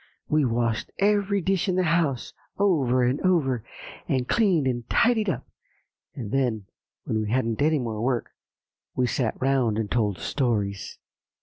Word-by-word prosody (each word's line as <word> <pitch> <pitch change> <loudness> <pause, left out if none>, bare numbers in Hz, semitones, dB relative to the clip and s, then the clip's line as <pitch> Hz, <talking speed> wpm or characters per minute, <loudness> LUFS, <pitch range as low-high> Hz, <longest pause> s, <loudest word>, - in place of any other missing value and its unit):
We 150 -2 +2
washed 115 -2 0
every 200 -1 +2
dish 195 +1 0
in 180 - +1
the 185 - +2
house, 160 -6 0 0.2
over 140 -11 +2
and 125 +3 +1
over, 140 - +1 0.4
and 130 -2 0
cleaned 190 - +2
and 120 -2 -2
tidied 225 -4 +3
up; 130 -7 -3 0.7
and 115 -7 -6
then, 120 -7 0 0.4
when 110 - -1
we 105 - -3
hadn't 115 -1 0
any 155 +1 +3
more 115 -5 -3
work, 125 0 -1 0.6
we 125 - +2
sat 120 -1 -1
round 130 -5 +1
and 110 -2 -2
told 105 -5 +1
stories." 105 - -2
130 Hz, 150 wpm, -25 LUFS, 115-170 Hz, 0.7 s, tidied